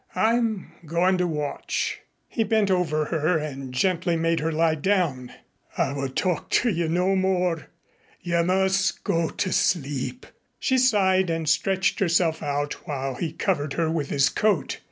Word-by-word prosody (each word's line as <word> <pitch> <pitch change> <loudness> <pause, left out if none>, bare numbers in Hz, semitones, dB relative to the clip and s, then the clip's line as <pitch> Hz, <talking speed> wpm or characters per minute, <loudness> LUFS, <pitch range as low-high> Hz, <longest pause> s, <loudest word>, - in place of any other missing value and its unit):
I'm 225 -3 +1
going 175 +4 +1
to 180 - +1
watch." 150 -3 -3 0.3
He 225 - -1
bent 215 -2 +1
over 155 -4 +1
her 160 +2 +1
and 135 -4 -5
gently 175 +5 +1
made 165 0 +1
her 160 +2 -1
lie 160 0 +2
down. 155 -7 0 0.5
"I 140 - +1
will 135 -1 -3
talk 175 +6 -1
to 245 - +2
you 170 -3 -1
no 180 +3 +2
more. 180 -4 0 0.5
You 170 -1 0
must 190 +2 +1
go 165 -1 0
to 185 - -2
sleep." 145 - -1 0.3
She 260 0 +1
sighed 190 -7 +3
and 165 -1 -2
stretched 190 +5 +1
herself 170 -3 +2
out 145 -1 -3
while 135 -2 -3
he 160 +5 -3
covered 155 -5 -1
her 165 -1 0
with 155 -4 -2
his 140 0 +3
coat. 210 -6 0
170 Hz, 155 wpm, -25 LUFS, 150-190 Hz, 0.5 s, sighed